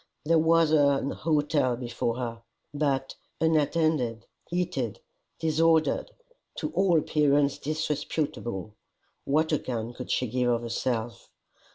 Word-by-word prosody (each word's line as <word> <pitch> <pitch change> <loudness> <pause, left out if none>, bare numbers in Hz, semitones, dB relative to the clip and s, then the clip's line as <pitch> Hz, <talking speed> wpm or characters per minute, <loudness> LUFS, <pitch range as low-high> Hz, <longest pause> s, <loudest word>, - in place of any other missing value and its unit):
There 165 +1 +4
was 165 0 +4
an 140 -2 +3
hotel 150 -5 +1
before 120 -1 -3
her! 115 -2 -4 0.3
But, 140 -2 0 0.3
unattended, 155 -7 +1 0.2
heated, 175 - -2 0.4
disordered, 160 - +2 0.5
to - - -3
all 190 - +3
appearance 145 -2 +2
disreputable, 145 - -3 0.5
what 155 +3 +2
account 120 -5 -2
could 125 - -7
she 125 - +1
give 125 +1 0
of 120 -1 +1
herself? 115 0 -3
145 Hz, 105 wpm, -27 LUFS, 120-160 Hz, 0.5 s, There